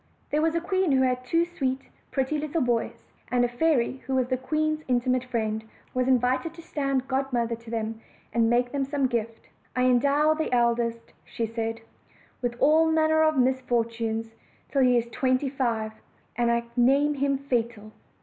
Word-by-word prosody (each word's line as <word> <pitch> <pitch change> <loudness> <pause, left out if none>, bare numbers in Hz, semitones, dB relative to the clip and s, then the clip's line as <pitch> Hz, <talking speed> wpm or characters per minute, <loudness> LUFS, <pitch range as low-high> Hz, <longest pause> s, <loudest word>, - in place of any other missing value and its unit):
THERE 300 - +2
was 325 +1 +1
a 335 - +1
queen 375 -3 +1
who 260 0 +4
had 255 -1 0
two 330 +7 +2
sweet, 270 -6 -2 0.3
pretty 270 +3 -1
little 305 +1 -1
boys; 240 -2 -1 0.3
and 245 -1 +2
a - - +1
fairy 255 0 +1
who 265 - 0
was 255 -1 +1
the 255 - +2
queen's 310 +4 -1
intimate 250 0 +1
friend 220 -3 -2 0.3
was 255 0 0
invited 260 +5 +1
to 335 - -10
stand 275 -5 -1
godmother 260 -3 0
to 230 0 -14
them, 225 0 -3 0.3
and 230 0 +3
make 245 +1 +2
them 280 -1 -1
some 275 0 0
gift. 230 -2 -3 0.3
"I 250 - +2
endow 280 +5 +4
the 315 -3 -2
eldest," 235 -1 0
said 225 -1 -3 0.3
she, 225 - -18 0.6
"with 240 -1 -1
all 315 +2 +5
manner 315 0 +3
of 310 -2 +3
misfortunes 230 -3 0 0.4
till 275 - +2
he 250 -1 +5
is 235 - +1
twenty 255 +2 +1
five; 235 -5 -1 0.4
and 240 -1 +1
I 235 0 +1
name 275 +4 +4
him 280 -1 0
Fatal." 235 -5 -2
255 Hz, 175 wpm, -26 LUFS, 235-285 Hz, 0.6 s, all